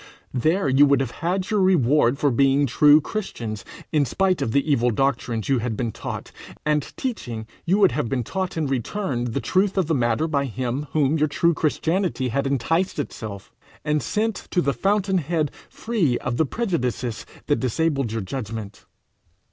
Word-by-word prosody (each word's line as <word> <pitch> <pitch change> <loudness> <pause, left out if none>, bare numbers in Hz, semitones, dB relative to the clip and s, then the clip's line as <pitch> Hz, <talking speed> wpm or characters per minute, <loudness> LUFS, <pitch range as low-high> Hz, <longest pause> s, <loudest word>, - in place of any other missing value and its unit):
There 160 +8 +1
you 135 +2 +5
would 140 0 +4
have 130 -4 -2
had 185 +4 -1
your 210 - +2
reward 145 -8 +3
for 145 -1 +2
being 135 +3 +3
true 145 +4 +6
Christians 115 - -5 0.3
in 150 -2 +3
spite 185 +8 +1
of 110 - 0
the 140 +5 +1
evil 125 -3 +3
doctrines 120 -2 -1
you 135 -2 +2
had 115 -2 -3
been 120 -3 -1
taught - - -6 0.3
and 150 0 +2 0.2
teaching: 120 - -4 0.2
you 185 +4 +3
would 195 -4 +5
have 115 - -2
been 130 -3 -1
taught 185 - -3
in 160 - 0
return 135 - -2
the 120 +3 -2
truth 190 +6 +1
of 190 - +3
the 160 - 0
matter 120 +3 +1
by 140 -3 0
him 130 +3 -3
whom 150 0 +2
your 155 - +3
true 170 +3 +2
Christianity 160 -2 0
had 135 +4 0
enticed 165 +8 0
to 145 - 0
itself, 100 -6 -8 0.3
and 150 0 +1
sent 215 - -2
to 180 - +1
the 140 -5 +1
fountainhead 185 -7 0 0.2
free 195 - 0
of 125 -1 -3
the 160 - +2
prejudices 125 - -2 0.2
that 145 - +1
disabled 135 -1 0
your 115 0 -2
judgment. 110 0 -6
140 Hz, 180 wpm, -23 LUFS, 125-170 Hz, 0.3 s, true